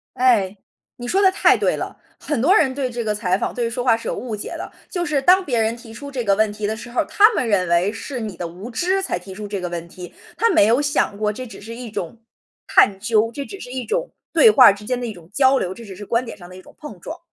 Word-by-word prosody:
哎， 215 -6 +2 0.4
你 245 - -7
说 385 +9 +2
得 380 - +6
太 385 - +4
对 - - +1
了！ - - -6 0.2
很 295 - -2
多 350 +10 +5
人 305 -9 +4
对 265 -1 -2
这 240 -1 -4
个 210 -1 -1
采 185 -3 0
访， - - -3
对 240 -2 -1
说 245 +2 -3
话 235 -3 +4
是 230 - -8
有 - - -2
误 240 -3 -5
解 205 - -6
的， - - -7 0.2
就 350 -2 -2
是 295 -4 0
当 370 +6 +5
别 250 -8 0
人 225 +1 +1
提 235 -1 -13
出 280 +4 -9
这 255 -3 -3
个 200 -3 +3
问 215 0 +1
题 210 0 -3
的 220 +1 -3
时 240 - -10
候 245 - +1
儿， - - -3
他 425 +2 +5
们 255 - 0
认 195 -4 +2
为 170 +4 +2
是 250 +4 -6
你 215 -5 -6
的 175 - -4
无 180 +7 -9
知 365 +10 0
才 380 - -2
提 190 +2 -10
出 210 +2 -7
这 200 -1 -4
个 180 -1 -4
问 170 -1 -5
题， 180 0 -11 0.2
他 460 - +3
没 205 - +5
有 235 +4 +3
想 285 -8 0
过 210 0 0
这 255 +3 -7
只 - - -11
是 225 +3 -9
一 240 -1 -7
种 210 +2 -6 0.5
探 195 -1 +4
究， 220 +1 +1
这 280 - -4
只 395 - -9
是 250 - -9
一 255 0 -4
种 - - -2 0.2
对 455 - +7
话 255 - +8
之 205 +1 -8
间 250 +2 -1
的 245 - -3
一 220 - -5
种 175 -3 -16
交 270 +2 +4
流， 185 -7 -2
这 235 - -12
只 200 -4 -10
是 205 +2 -9
观 230 +4 0
点 230 -3 -9
上 175 - -12
的 180 - -13
一 185 - -11
种 - - -18
碰 220 -12 -9
撞。 315 - -8
230 Hz, 315 characters per minute, -21 LUFS, 200-265 Hz, 0.5 s, 话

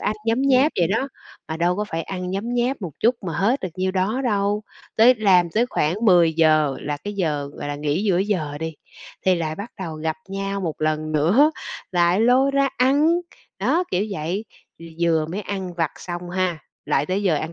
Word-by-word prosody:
ăn 215 - 0
nhấm 230 +4 +2
nháp 275 +2 +4
vậy 175 - +3
đó, 225 +7 0 0.4
mà 160 - -3
đâu 175 +2 +1
có 210 - -1
phải 165 -5 -4
ăn 180 -1 -5
nhấm 210 +6 -3
nháp 245 -1 0
một 175 - -4
chút 240 +3 +4
mà 170 - -2
hết 230 +8 +2
được 185 - -3
nhiêu 185 0 -1
đó 195 +7 0
đâu. 205 -2 0 0.3
Tới 240 +3 +7
làm 185 -6 +3
tới 225 +7 +2
khoảng 155 -8 0
10:00 160 -6 +4
là 145 0 -3
cái 205 +8 -6
giờ, 150 -7 -1
gọi - - -6
là, 145 - -2
nghỉ 150 +5 -1
giữa 185 -4 +2
giờ 175 -8 -1
đi, 160 0 -4 0.5
thì 185 - +5
lại 160 -2 -2
bắt 205 +6 -7
đầu 165 -4 -4
gặp 155 0 -3
nhau 195 0 -3
một 165 -5 -4
lần 155 0 -1
nữa, 190 - +4 0.4
lại 175 +3 +3
lôi 255 +4 +4
ra 275 0 +2
ăn. 275 +5 +4 0.5
Đó, 360 +2 +1
kiểu 185 +3 +1
vậy, 180 +4 -3 0.3
v - - -14 0.2
vừa 160 -2 +2
mới 185 +6 -4
ăn 190 -3 -5
vặt 165 -3 0
xong 175 0 -6
ha, 180 -2 -1 0.3
lại 140 +2 +1
tới 190 +2 -1
giờ 185 -6 +2
ăn 155 +3 -3
185 Hz, 210 wpm, -22 LUFS, 160-215 Hz, 0.5 s, Tới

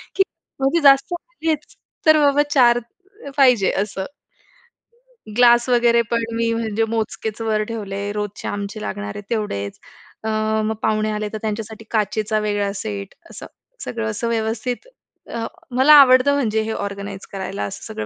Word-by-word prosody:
की 385 - +5 0.4
म्हणजे 275 +5 +2
जास्त 275 +4 +5
आलेच 320 - -4 0.3
तर 310 0 +7
बाबा 285 0 +4
4 240 -3 +5 0.6
पाहिजे 250 -8 +5
असं. 195 -2 -5 1.3
ग्लास 240 0 +5
वगैरे 235 -1 +4
पण 230 -1 +1
मी 230 0 +1
म्हणजे 225 -1 -1
मोजकेच 220 0 -3
वर 215 -1 0
ठेवले, 205 -3 -4
रोजचे 210 -1 -4
आमचे 205 +1 -4
लागणार 205 +1 -5
आहे 205 - -6
तेवढेच. 205 - -3 0.4
अ, 220 - -2 0.4
मग 220 - -1
पाहुणे 215 0 +1
आले 210 0 -3
तर 215 - -2
त्यांच्यासाठी 220 0 -5
काचेचा 215 0 0
वेगळा 205 -1 -1
सेट 200 -1 -5 0.2
असं. - - -9 0.4
सगळं 225 -2 -3
असं 225 +2 -3
व्यवस्थित 230 - -2 0.5
अ, 230 -1 -2 0.3
मला 270 +4 +7
आवडतं 260 +1 +6
म्हणजे 220 -6 +1
हे 220 - -3
ऑर्गनाइज 200 -1 -5
करायला 190 - -4
असं 100 - -6
सगळं 105 - -4
220 Hz, 145 wpm, -21 LUFS, 205-240 Hz, 1.3 s, तर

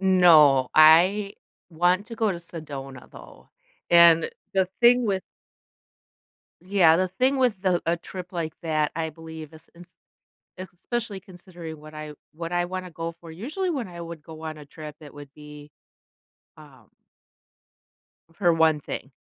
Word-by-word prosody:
No. 160 -9 +5
I 180 +6 +5 0.4
want 180 +5 +1
to 230 - -8
go 220 -2 0
to 175 - -4
Sedona, 140 -6 -9
though, - - -15 0.4
and 170 -1 +6 0.2
the 190 -1 +2
thing 245 0 +5
with 190 -2 -1 1.4
Yeah, 180 -4 +4
the 185 0 +1
thing 255 +9 0
with 240 -7 +1
the 185 -3 +1
a 170 +1 +1
trip 180 +1 -9
like 165 -3 -4
that, 155 -2 0
I 160 -1 -2
believe, 160 -1 -11
is 160 - -17
ins 175 +1 -15 0.7
especially 195 +3 -5
considering 175 -4 -11
what 155 0 -13
I 155 0 -8 0.2
what 165 +2 -6
I 175 0 0
wanna 185 0 -6
go 165 +1 -5
for. 165 -1 -13
Usually, 300 - -4
when 265 - -3
I 170 -1 -9
would 165 -2 -8
go 160 0 -12
on 155 -1 -6
a 150 - -12
trip, 150 +1 -10
it 145 - -13
would 145 -1 -12
be, 150 -1 -13 0.9
um - - -18 1.4
for 175 -1 +2
one 160 -2 +3
thing, 135 -1 -7
170 Hz, 155 wpm, -25 LUFS, 155-185 Hz, 1.4 s, and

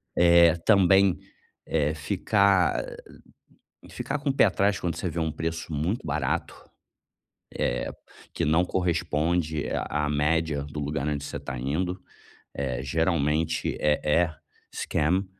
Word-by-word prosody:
É, 85 -1 +6
também, 95 0 +4 0.5
eh, 75 -1 0
ficar 100 +5 +2 1.1
ficar - - -4
com 140 - -2
o - - +1
pé - - +6
atrás 100 0 +1
quando 85 -2 -2
você 90 - -3
vê 85 - -4
um 80 -1 0
preço 80 +1 -4
muito 80 +8 -2
barato, 75 0 -2 1.0
eh, 60 - -1 0.4
que - - -1
não 80 +4 +3
corresponde 85 -3 -1
a 75 0 -1
a - - -2
média 75 0 0
do 75 +1 -7
lugar 75 0 -2
onde 75 -1 -2
você - - -5
está 70 -2 -6
indo, 90 +9 -2 0.5
eh, 65 -3 -3
geralmente 80 +1 0
é 75 0 +2
é 80 +1 +2 0.4
scam 90 +6 0
80 Hz, 135 wpm, -26 LUFS, 75-90 Hz, 1.1 s, É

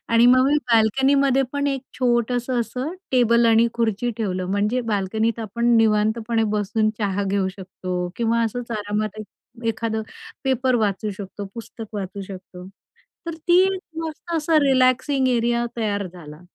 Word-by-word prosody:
आणि 230 +1 +5
मग 255 +1 +6
मी 290 +2 +3 0.2
बाल्कनीमध्ये 270 +4 +3
पण 285 0 -1
एक 270 -2 -1 0.2
छोटंसं 245 0 +1
असं 255 +7 -4 0.2
टेबल 235 -2 +4
आणि 225 0 +5
खुर्ची 230 0 0
ठेवलं, 185 -5 -2
म्हणजे 210 +5 +1
बाल्कनीत 220 +1 -1
आपण 230 +2 -2
निवांतपणे 225 +1 +2
बसून 215 +1 +1
चहा 200 -1 -1
घेऊ 195 -1 0
शकतो 185 -1 -5
किंवा 230 0 +1
असंच 235 +2 -4
आरामात 210 0 -3
एक 230 +2 -13
एखादं 225 0 -2 0.4
पेपर 260 -1 +1
वाचू 210 -1 0
शकतो, 200 +1 -7
पुस्तक 225 -1 -8
वाचू 200 0 -5
शकतो. 185 -1 -10 0.6
तर 335 - -3
ती 350 +1 +7
एक 380 -1 -1 0.2
मस्त 325 +2 -7
असा 315 +1 +2
रिलॅक्सिंग 260 0 +3
एरिया 240 -1 +1
तयार 205 -3 -1
झाला. 160 -4 -12
230 Hz, 145 wpm, -22 LUFS, 205-250 Hz, 0.6 s, ती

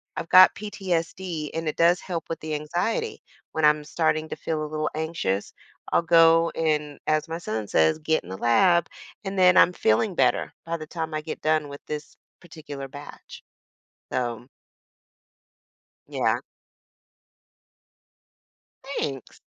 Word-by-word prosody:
I've 165 - -5
got 185 0 +8
PTSD, 180 -5 -3
and 165 0 -3
it 155 - -1
does 170 +2 +4
help 170 -4 -5
with 165 - -4
the 155 -1 -4
anxiety. 175 - -2 0.3
When 160 -1 +1
I'm 150 0 +4
starting 155 0 0
to - - -5
feel 155 -1 -3
a - - -3
little 155 0 -1
anxious, 155 - -2 0.4
I'll - - +4
go 165 0 +5
and, 150 -2 -1
as 155 +1 +1
my 165 +1 -4
son 110 -9 -4
says, 80 - +2
"Get 160 0 0
in 90 - -13
the 95 - -6
lab." 170 - +3 0.4
And 195 0 -4
then 180 0 +6
I'm 180 - +6
feeling 180 - +1
better - - +1
by 165 0 -2
the 155 -1 -9
time 160 -1 -5
I 155 - -1
get 155 - -7
done 155 -1 +1
with 140 0 -10
this 150 0 -6 0.2
particular 145 -5 -9
batch. 145 +2 -12 0.7
So 120 -1 -3 1.6
Yeah. - - 0 2.4
Thanks. 140 - -5
160 Hz, 145 wpm, -25 LUFS, 150-170 Hz, 2.4 s, got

